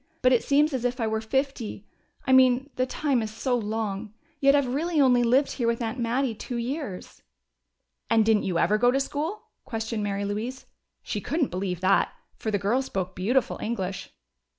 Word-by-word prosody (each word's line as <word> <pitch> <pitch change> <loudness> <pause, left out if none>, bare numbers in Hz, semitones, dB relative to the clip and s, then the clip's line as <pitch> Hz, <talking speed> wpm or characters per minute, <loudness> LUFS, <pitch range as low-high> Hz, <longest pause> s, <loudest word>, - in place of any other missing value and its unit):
"But 255 0 +5
it 240 - +3
seems 295 +2 +3
as 255 -2 -2
if 250 +1 -1
I 230 - +1
were 220 0 -1
fifty. 245 -3 -2 0.4
I 260 - +3
mean 260 +2 +5
the 255 0 0
time 275 -2 0
is 220 - -3
so 230 +4 -1
long. 215 -2 -3 0.2
Yet 275 0 +5
I've 265 -3 +1
really 320 +3 0
only 250 -3 +5
lived 255 +4 +3
here 240 -3 -1
with 230 0 +1
Aunt 230 +1 -3
Mattie 240 +1 0
two 245 +3 -6
years." 245 - -5 0.9
"And 225 -1 +4
didn't 220 -2 +4
you 180 -3 -1
ever 210 +5 +3
go 245 +2 +5
to 265 +2 +2
school?" 305 +9 -3 0.2
questioned 225 -1 -3
Mary 200 -1 -2
Louise. 225 +6 -4 0.4
She 205 - -3
couldn't 295 - -1
believe 180 -1 -3
that, 190 +1 +2 0.2
for 220 - -4
the 205 - +1
girl 210 +7 +1
spoke 190 -8 -4
beautiful 230 +8 0
English. 195 -4 -3
235 Hz, 190 wpm, -26 LUFS, 210-265 Hz, 0.9 s, But